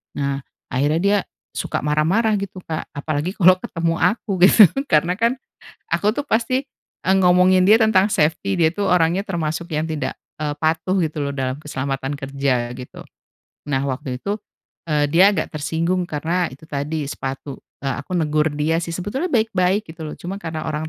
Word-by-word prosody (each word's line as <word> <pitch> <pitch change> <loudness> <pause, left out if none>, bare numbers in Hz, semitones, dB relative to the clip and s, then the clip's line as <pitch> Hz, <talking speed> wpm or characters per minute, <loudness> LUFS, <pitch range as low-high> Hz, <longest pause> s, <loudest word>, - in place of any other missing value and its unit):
nah, 140 -1 -1 0.3
akhirnya 145 +5 +1
dia 205 +1 +4 0.4
suka - - -2
marah-marah 175 +9 +2
gitu 195 -1 -6
Kak, 160 -1 -4
apalagi 150 +5 -2
kalo 185 -1 +6
ketemu 165 -1 -2
aku, 215 -1 +1 0.2
gitu 215 - +8 0.2
karena 170 +2 +2
kan 235 +3 +2 0.5
aku 210 +1 +1
tuh 285 +5 -3
pasti, 240 +3 +1 0.4
eee, 190 - +3
ngomongin 180 0 +5
dia 215 +4 +6
tentang 205 -2 +4
safety, 170 +5 +1
dia 160 - +5
tuh 205 - -1
orangnya 180 +3 +2
termasuk 170 -2 -3
yang 155 +2 -1
tidak, 155 -2 -3 0.2
eee, 150 -1 -2
patuh 160 +4 +1
gitu 155 -3 -1
loh 140 - -2
dalam 130 -1 -2
keselamatan 135 -1 -3
kerja, 135 -3 -1
gitu. 125 0 -10 0.7
Nah 135 -1 +1
waktu 130 -1 -3
itu, 200 +7 -2 0.6
eee, 150 -1 +3
dia 185 +5 +6
agak 155 - -2
tersinggung 165 +4 -1
karena 165 +4 0
itu 135 +4 -13
tadi, 150 +1 -3
sepatu, 135 0 -5 0.3
eee, 135 -2 -1
aku 180 +5 -4
negur 155 -1 +1
dia 155 +3 +1
sih 170 - -4
sebetulnya 230 - -3
baik-baik 205 -3 +2
gitu 165 - -9
loh - - -8
cuma 190 +3 -5
karena 160 -1 -4
orang 155 0 -3
160 Hz, 170 wpm, -21 LUFS, 150-185 Hz, 0.7 s, gitu